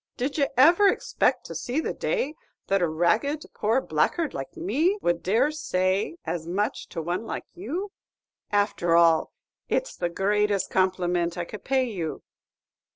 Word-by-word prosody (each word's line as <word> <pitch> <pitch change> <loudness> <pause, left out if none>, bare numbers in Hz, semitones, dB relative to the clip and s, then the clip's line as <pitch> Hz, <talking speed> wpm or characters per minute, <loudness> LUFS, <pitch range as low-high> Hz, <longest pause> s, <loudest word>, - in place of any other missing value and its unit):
Did 270 +5 -2
ye 280 - +3
ever 340 +10 +7
expect - - +1
to - - -7
see 250 +5 -2
the - - -2
day 305 - -1 0.3
that 195 -1 +1
a 175 - +3
ragged 215 - +1
poor 225 +5 +1
blackguard 260 - 0
like 135 0 -6
me 315 - +1
would 175 - 0
dare 225 +10 +2
to - - -9
say 190 - 0
as 165 -2 -3
much 200 +5 -2
to 165 - -5
one 175 +5 -2
like - - -4
you? 335 - -4 0.6
And, 205 - +4
after 175 -4 0
all, 165 -1 +4 0.4
it's - - -1
the 175 - -1
greatest 205 +2 +1
compliment 180 -2 +1
I 175 - -2
could 210 - -9
pay 265 -1 +2
you." 185 -10 -4
205 Hz, 165 wpm, -26 LUFS, 175-275 Hz, 0.6 s, ever